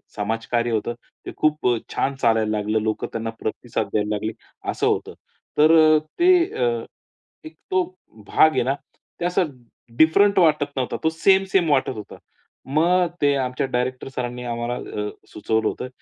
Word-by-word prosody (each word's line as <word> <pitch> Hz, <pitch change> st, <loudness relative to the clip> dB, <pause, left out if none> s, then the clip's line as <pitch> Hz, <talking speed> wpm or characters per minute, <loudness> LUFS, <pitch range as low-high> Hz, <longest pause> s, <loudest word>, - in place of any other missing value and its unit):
समाजकार्य 115 Hz, +3 st, -1 dB
होतं 110 Hz, +2 st, -1 dB, 0.3 s
ते -, -, -5 dB
खूप 155 Hz, -3 st, +1 dB, 0.3 s
छान 140 Hz, -, 0 dB
चालायला 110 Hz, -2 st, +2 dB
लागलं. 105 Hz, +1 st, 0 dB
लोकं 110 Hz, 0 st, -2 dB
त्यांना 115 Hz, 0 st, -3 dB
प्रतिसाद 110 Hz, -1 st, -3 dB
द्यायला 105 Hz, -1 st, 0 dB
लागले. 110 Hz, +2 st, -3 dB, 0.4 s
असं -, -, -1 dB
होतं. -, -, -1 dB, 0.4 s
तर 155 Hz, +2 st, +6 dB
अ, 155 Hz, -1 st, +6 dB, 0.2 s
ते 355 Hz, +2 st, +5 dB, 0.3 s
अ, -, -, 0 dB, 0.8 s
एक 155 Hz, 0 st, -10 dB, 0.2 s
तो 185 Hz, -1 st, +3 dB, 0.4 s
भाग 155 Hz, -, +5 dB
आहे 130 Hz, -, +1 dB
ना, 130 Hz, +3 st, +1 dB, 0.5 s
ते 175 Hz, -, -2 dB
असा 180 Hz, +1 st, +2 dB, 0.5 s
डिफरंट 200 Hz, +5 st, +5 dB
वाटत 155 Hz, -4 st, +4 dB
नव्हता. 130 Hz, -2 st, -1 dB
तो 160 Hz, -, +3 dB
सेम-सेम 190 Hz, +1 st, +2 dB
वाटत 135 Hz, -2 st, +2 dB
होता. 105 Hz, -2 st, -9 dB, 0.5 s
मग 175 Hz, +6 st, +3 dB
ते 145 Hz, -1 st, +4 dB
आमच्या 130 Hz, 0 st, -1 dB
डायरेक्टर 125 Hz, +1 st, -2 dB
सरांनी 125 Hz, 0 st, -4 dB
आम्हाला 120 Hz, 0 st, -3 dB, 0.3 s
अ, 105 Hz, -, -2 dB, 0.2 s
सुचवलं 110 Hz, +1 st, 0 dB
होतं 125 Hz, -, -3 dB
130 Hz, 155 wpm, -22 LUFS, 115-160 Hz, 0.8 s, तर